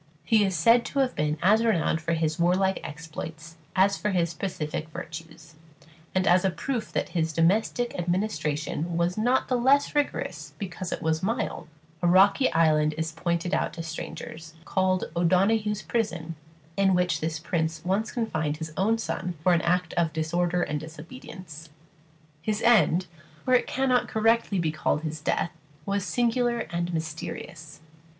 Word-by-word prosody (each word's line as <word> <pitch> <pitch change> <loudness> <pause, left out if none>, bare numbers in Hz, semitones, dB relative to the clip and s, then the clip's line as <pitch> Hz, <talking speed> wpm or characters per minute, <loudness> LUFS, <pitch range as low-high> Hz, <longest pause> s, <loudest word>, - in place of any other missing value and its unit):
He 220 -2 +4
is 190 -2 0
said 230 +9 +5
to - - -5
have 265 -2 +2
been 150 +1 -1
as 215 +5 +5
renowned 170 -7 +1
for 170 +1 -1
his 160 -1 0
warlike 185 +3 +2
exploits 160 +1 -8 0.2
as 195 +1 +4
for 210 - -1
his 170 -3 +1
pacific 155 -3 -4
virtues; 160 0 -9 0.6
and 185 0 +2
as 180 +1 +5
a 190 - +3
proof 235 +6 -3
that - - -1
his 165 -2 0
domestic 200 +9 +1
administration 175 -3 -2
was 170 +1 +1
not 245 +4 +2
the 250 - +1
less 275 +4 +3
rigorous 165 - -2
because 180 0 -5
it - - -4
was 160 0 +1
mild, 220 -5 -2 0.3
a 175 - +2
rocky 200 +9 +5
island 155 -2 +3
is 160 0 -2
pointed 170 +2 -2
out - - 0
to 165 - -6
strangers, 160 0 -7
called 185 -1 +1
"O'Donoghue's 200 +5 +2
Prison," 175 -8 -2 0.4
in 195 -1 +3
which 180 -3 +1
this 160 0 -2
prince 160 +1 -2
once 200 +4 0
confined 155 -11 -1
his 160 -1 -6
own 220 +4 +2
son 180 -5 -3
for 180 - +5
some 170 - +3
act 175 -1 +1
of 165 -2 +1
disorder 175 +2 0
and 150 0 -2
disobedience. 160 - -10 0.7
His 215 +4 -2
end 195 -6 +4 0.4
for 255 - +2
it 250 - +4
cannot 255 -1 +1
correctly 225 -2 +2
be 165 -3 +1
called 155 0 -1
his 155 -1 -4
death 165 - 0 0.3
was 200 -1 -1
singular 240 +1 +1
and 170 +1 -2
mysterious. 160 0 -6
175 Hz, 160 wpm, -26 LUFS, 160-210 Hz, 0.7 s, said